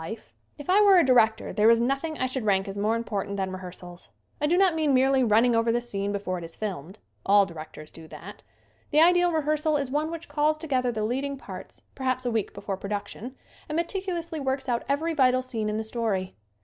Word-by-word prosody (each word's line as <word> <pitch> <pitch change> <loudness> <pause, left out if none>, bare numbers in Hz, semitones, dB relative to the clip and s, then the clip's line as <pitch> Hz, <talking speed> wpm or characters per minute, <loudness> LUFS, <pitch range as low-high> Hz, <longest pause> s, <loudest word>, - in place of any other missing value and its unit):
90 185 +8 -5
SCREEN - - -20 0.4
ACTING 290 - -9
If - - -14
I 405 +3 +6
were 400 -2 +7
a 345 - +5
director 225 -4 +3
there 215 +1 +4
is 230 0 +5
nothing 275 +6 -1
I 255 - 0
should 255 -1 -2
rank 195 -2 +1
as 195 - -5
more 210 +3 +1
important 205 -3 -3
than 190 -1 -2
rehearsals. 180 -1 -9 0.3
I 295 - +2
do 345 +3 +2
not 380 -2 +4
mean 310 -4 +2
merely 265 0 +3
running 230 +2 +4
over 230 0 +2
the 240 - +1
scene 200 -4 -3
before 195 -3 -3
it - - -9
is 165 0 -8
filmed. 190 -3 -6 0.3
All 200 0 +5
directors 155 -2 -10
do 160 -1 -13
that. - - -11 0.5
The 300 - +3
ideal 355 +1 +5
rehearsal 305 -1 +1
is 275 -3 -3
one 300 +3 0
which 335 0 -7
calls 300 +1 +1
together 260 -6 -1
the 220 -2 -3
lead 250 +6 -1
ing 280 0 -4
parts 270 - -10
perhaps 255 -1 -2
a 245 - 0
week 225 -3 -1
before 200 -1 -5
production 205 +5 -6 0.3
and 305 - -3
meticulously 340 -2 -3
works 265 0 -2
out 240 -2 0
every 315 +4 0
vital 255 -3 +3
scene 225 -4 -3
in 210 - -2
the 220 - -2
story. 215 -5 -2
245 Hz, 225 wpm, -26 LUFS, 205-295 Hz, 0.5 s, were